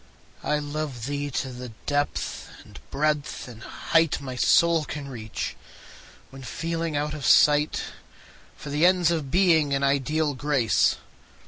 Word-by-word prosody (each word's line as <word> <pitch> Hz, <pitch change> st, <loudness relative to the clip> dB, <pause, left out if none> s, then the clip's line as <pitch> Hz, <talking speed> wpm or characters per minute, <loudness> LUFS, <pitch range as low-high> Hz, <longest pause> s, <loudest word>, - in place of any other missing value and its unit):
I 150 Hz, -, +1 dB
love 145 Hz, -5 st, -4 dB
thee 145 Hz, +1 st, -3 dB
to 135 Hz, 0 st, -3 dB
the 125 Hz, 0 st, -8 dB, 0.2 s
depth 145 Hz, 0 st, -2 dB, 0.2 s
and -, -, -13 dB
breadth 150 Hz, -2 st, -1 dB
and 115 Hz, -2 st, -11 dB
height 165 Hz, +5 st, +1 dB
My 130 Hz, -2 st, -6 dB
soul 165 Hz, +5 st, +4 dB
can 145 Hz, -1 st, -6 dB
reach, 110 Hz, -5 st, -5 dB, 0.8 s
when 135 Hz, 0 st, -11 dB
feeling 165 Hz, +2 st, -3 dB
out 150 Hz, +1 st, -2 dB
of 150 Hz, -2 st, -7 dB
sight 150 Hz, +2 st, +4 dB, 0.7 s
For 145 Hz, -, -8 dB
the 150 Hz, +3 st, 0 dB
ends 180 Hz, -2 st, +3 dB
of 155 Hz, -5 st, -2 dB
Being 160 Hz, -5 st, +3 dB
and 140 Hz, -, -1 dB
ideal 145 Hz, +2 st, +1 dB
Grace. 135 Hz, -4 st, +2 dB
145 Hz, 140 wpm, -25 LUFS, 135-155 Hz, 0.8 s, soul